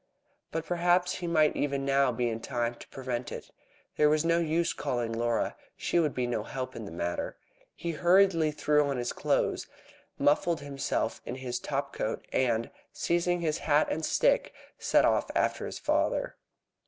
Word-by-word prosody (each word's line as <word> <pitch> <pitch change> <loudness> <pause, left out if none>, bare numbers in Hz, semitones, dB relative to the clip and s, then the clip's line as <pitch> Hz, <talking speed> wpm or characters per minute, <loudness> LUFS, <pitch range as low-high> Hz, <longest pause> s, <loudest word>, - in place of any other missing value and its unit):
But 165 0 -3
perhaps 175 +1 +2
he 175 - -4
might 155 -3 +3
even 140 -1 -1
now 135 -1 +3
be 120 +1 -1
in 115 -1 -2
time 120 -1 -2
to - - -13
prevent 125 -2 -4
it. - - -8 0.5
There 150 0 +5
was 155 +1 +2
no 170 0 +3
use 165 +1 +1
calling 120 -5 -2
Laura. 115 0 0 0.2
She 175 - +1
could 155 -4 +1
be 125 - 0
no 120 -3 -1
help 130 +3 -5
in 115 - -6
the 100 - -8
matter. 85 +1 -3 0.4
He 170 - -3
hurriedly 175 0 +4
threw 150 -1 +2
on 135 - -1
his 120 0 -2
clothes, - - 0 0.5
muffled 155 +3 +2
himself 140 -1 -2
in 125 - -5
his 130 -2 -4
top 140 -1 -3
coat, 110 - -3
and, 115 -3 +1 0.2
seizing 175 +1 0
his 160 -1 0
hat 150 0 +2
and 160 - -2
stick, - - +2 0.2
he - - -19
set - - +4
off - - +2
after - - +1
his - - -6
father. - - 0
145 Hz, 180 wpm, -29 LUFS, 125-170 Hz, 0.5 s, There